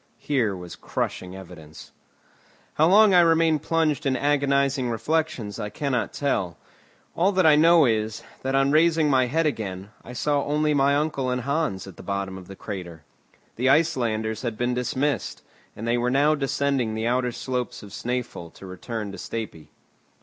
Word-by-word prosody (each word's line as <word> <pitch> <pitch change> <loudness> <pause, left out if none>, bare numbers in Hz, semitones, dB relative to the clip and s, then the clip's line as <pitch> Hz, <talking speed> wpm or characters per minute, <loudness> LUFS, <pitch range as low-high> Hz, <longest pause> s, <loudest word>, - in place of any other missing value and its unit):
Here 120 -9 0
was 90 -1 -9
crushing 90 0 -4
evidence. 85 -5 -12 0.8
How 155 - +3
long 205 +2 +6
I 180 - +7
remained 165 -2 +3
plunged 160 -4 0
in 130 -1 +1
agonizing 140 -2 +1
reflections 120 -4 -2
I 105 -1 -3
cannot 130 +3 -2
tell; 100 - -2 0.6
all 185 +4 +3
that 185 -2 +2
I 155 -2 +7
know 165 +1 +6
is, 110 -2 -1 0.2
that 135 +1 -1
on 135 0 +3
raising 160 -1 +3
my 130 -2 +3
head 160 +5 0
again, 100 -8 -3
I 125 - -10
saw 145 +2 0
only 150 +1 +1
my 140 0 +3
uncle 145 -3 -1
and 125 0 -1
Hans 140 - -1
at 95 -3 -12
the - - -10
bottom 100 -1 -3
of 95 -1 -10
the 95 - -10
crater. 90 -6 -7 0.5
The 130 +3 +2
Icelanders 115 -7 +1
had 115 -4 -4
been 120 0 0
dismissed, 125 +2 -2 0.3
and 115 - -6
they 120 +1 +1
were 120 +1 0
now 145 +4 +3
descending 135 -5 -1
the 110 +1 -2
outer 125 +1 +1
slopes 125 -1 -4
of 100 - -11
Snæfell 120 -7 -4
to - - -12
return 100 +3 -6
to 100 - -9
Stapi. 95 -10 -6
125 Hz, 170 wpm, -24 LUFS, 110-150 Hz, 0.8 s, I